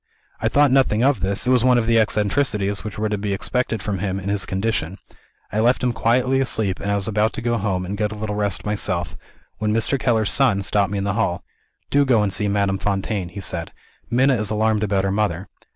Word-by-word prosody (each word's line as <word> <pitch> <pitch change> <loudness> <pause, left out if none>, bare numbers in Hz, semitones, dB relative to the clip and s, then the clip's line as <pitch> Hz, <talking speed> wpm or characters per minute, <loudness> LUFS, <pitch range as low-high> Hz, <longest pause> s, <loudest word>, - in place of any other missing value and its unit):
I - - 0
thought 145 -1 +4
nothing 130 -4 +3
of 135 -4 +3
this 95 +4 0
it 125 - +2
was 125 -2 +4
one 125 -1 +4
of 120 - +1
the 115 0 +3
eccentricities 105 -1 0
which 105 -2 -6
were 110 +1 0
to 105 -1 -2
be 100 -1 -2
expected 115 +1 -2
from 100 -3 -2
him, 95 0 -2
in 100 +1 -5
his 100 -1 -1
condition. 95 -3 -2 0.5
I 105 - -1
left 120 +3 +2
him 125 -1 +1
quietly 125 +5 +2
asleep; 110 -7 -1
and 100 - -2
I - - +2
was 100 -1 -2
about 110 0 +1
to - - -5
go 120 0 +1
home, 95 -3 -1
and 100 +3 -4
get 105 -1 0
a - - -6
little 105 0 -4
rest 105 -2 -2
myself 90 -6 -2 0.4
when 105 0 0
Mr. 115 +5 +1
Keller's 110 -3 +1
son 115 -8 +2
stopped 100 -1 +1
me 100 - -2
in 100 - -2
the 100 0 -1
hall. 105 -5 -1 0.5
'Do 145 0 +4
go 120 -5 +3
and 100 -2 0
see 105 - 0
Madame 100 -1 0
Fontaine,' 95 -1 -2
he 100 +3 -8
said; 85 -3 -4 0.4
'Minna 130 +3 +3
is 105 -2 -2
alarmed 110 0 +1
about 100 -2 +1
her 95 - 0
mother.' 100 -3 -1
105 Hz, 235 wpm, -21 LUFS, 100-115 Hz, 0.5 s, thought